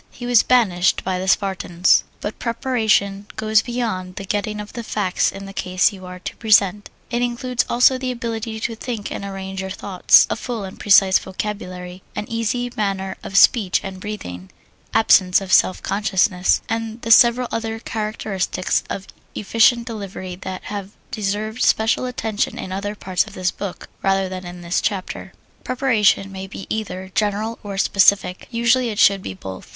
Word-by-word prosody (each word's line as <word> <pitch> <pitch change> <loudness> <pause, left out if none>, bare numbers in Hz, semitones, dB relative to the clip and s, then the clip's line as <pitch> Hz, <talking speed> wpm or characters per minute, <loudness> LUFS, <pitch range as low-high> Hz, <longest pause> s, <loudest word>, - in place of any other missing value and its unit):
He 245 - -9
was 245 -2 +5
banished 195 -8 +2
by 185 -1 -1
the 190 - -4
Spartans. 190 -3 +2 0.2
But 205 - -5
preparation 220 -5 0
goes 220 0 +3
beyond 220 -7 -3
the 200 - -6
getting 210 +1 -2
of 210 0 -8
the 235 - -5
facts 205 -4 0
in 195 0 -8
the 195 - -9
case 185 +2 +1
you 185 -2 -10
are 180 0 -8
to 180 - -7
present: 205 -2 +3 0.2
it 240 0 0
includes 245 0 -1
also 250 +2 +4
the 255 0 -3
ability 230 -2 -4
to 230 - -2
think 225 -3 -5
and - - -5
arrange 190 -1 -5
your 190 - -5
thoughts, 190 -1 +4
a - - +1
full 235 -5 -5
and 190 -1 -9
precise 195 -2 +5
vocabulary, 185 -2 -6
an 210 - -3
easy 230 +2 -1
manner 195 -2 -2
of 195 - -2
speech 200 -3 +5
and 190 -1 -7
breathing, 95 - -7 0.4
absence 190 -4 +5
of 195 -1 -4
self 185 - +4
consciousness, 190 -2 +1
and 225 +1 -4
the 230 - -1
several 240 +2 +6
other 225 0 -3
characteristics 215 -4 -2
of 195 - -4 0.3
efficient 230 +3 +3
delivery 195 -5 -6
that 185 0 -7
have 200 -2 -6 0.2
deserved 215 0 -3
special 225 +3 +2
attention 220 -4 -2
in 185 - -6
other 200 +2 -3
parts 185 -3 0
of - - -11
this 185 -1 -1
book 200 -3 -7
rather 195 0 +1
than 185 -1 -6
in 175 0 -9
this 170 +1 -1
chapter. 190 -3 -3 0.3
Preparation 230 -6 +2
may 190 0 -7
be 195 - -8
either 190 -3 -4
general 215 +2 -1
or 200 -2 -6
specific; 195 -1 +3
usually 235 +1 +2
it 210 - -5
should 200 -1 +5
be 95 - -6
both. 95 0 -9
205 Hz, 170 wpm, -21 LUFS, 190-225 Hz, 0.4 s, several